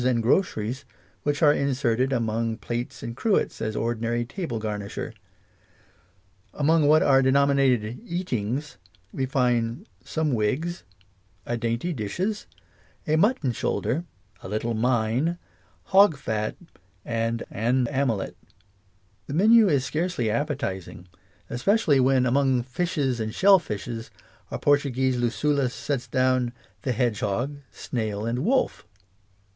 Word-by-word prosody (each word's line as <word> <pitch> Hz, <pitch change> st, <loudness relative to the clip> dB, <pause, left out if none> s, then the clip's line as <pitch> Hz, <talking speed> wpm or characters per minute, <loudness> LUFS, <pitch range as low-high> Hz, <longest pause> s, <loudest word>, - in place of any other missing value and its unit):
v. 125 Hz, -, +1 dB
and 120 Hz, -2 st, +1 dB
"groceries," 125 Hz, -, 0 dB, 0.4 s
which 145 Hz, +2 st, -1 dB
are 145 Hz, -1 st, +7 dB
inserted 130 Hz, -2 st, 0 dB
among 115 Hz, -2 st, -1 dB
plates 120 Hz, +2 st, -5 dB
and 115 Hz, -, -5 dB
cruets 220 Hz, -, 0 dB
as 110 Hz, 0 st, -2 dB
ordinary 120 Hz, +1 st, -1 dB
table 135 Hz, -, -4 dB
garniture. 105 Hz, -2 st, -4 dB, 1.4 s
Among 155 Hz, +1 st, +3 dB
what 155 Hz, +1 st, +5 dB
are 135 Hz, -1 st, +5 dB
denominated 130 Hz, -, +2 dB
"Eatings" 150 Hz, -, -3 dB, 0.4 s
we 130 Hz, -1 st, -1 dB
find 125 Hz, -, 0 dB
" -, -, -34 dB
some 160 Hz, -2 st, -1 dB
wigs," 140 Hz, -, -1 dB, 0.3 s
" 95 Hz, 0 st, -38 dB
a 120 Hz, -, -2 dB
dainty 115 Hz, +9 st, -1 dB
dishes," 175 Hz, -, -3 dB, 0.3 s
" -, -, -33 dB
a 155 Hz, -, +3 dB
mutton 165 Hz, -, +2 dB
shoulder," 140 Hz, +6 st, -1 dB, 0.4 s
"a -, -, -8 dB
little 110 Hz, +3 st, -1 dB
mine," 120 Hz, +7 st, +1 dB, 0.5 s
"hog 195 Hz, -5 st, +5 dB
fat," 110 Hz, -5 st, -2 dB, 0.5 s
and 115 Hz, 0 st, -1 dB
" -, -, -29 dB, 0.2 s
an 125 Hz, -1 st, +2 dB
amelet 130 Hz, -7 st, -1 dB, 0.5 s
": 95 Hz, 0 st, -39 dB
the 140 Hz, -, -4 dB
vtenn 215 Hz, +3 st, +6 dB
is 140 Hz, -4 st, +2 dB
scarcely 155 Hz, -4 st, -1 dB
appe 145 Hz, +6 st, 0 dB
tising, 95 Hz, -, -5 dB, 0.4 s
especially 145 Hz, -, +2 dB
when 130 Hz, 0 st, +3 dB
among 130 Hz, -1 st, +2 dB
"Fishes 135 Hz, -1 st, -1 dB
and 110 Hz, -1 st, -3 dB
Shellfishes 120 Hz, -, +2 dB, 0.2 s
" -, -, -32 dB
our -, -, -3 dB
Portuguese 130 Hz, -3 st, +2 dB
Lucullus 130 Hz, +2 st, 0 dB
sets 140 Hz, -4 st, -3 dB
down 130 Hz, -1 st, +1 dB, 0.3 s
the 130 Hz, -, -1 dB
"hedgehog," 120 Hz, +3 st, -1 dB
"snail," 110 Hz, -3 st, -3 dB
and 115 Hz, +2 st, -1 dB
"wolf." 245 Hz, -, 0 dB
125 Hz, 130 wpm, -25 LUFS, 115-145 Hz, 1.4 s, are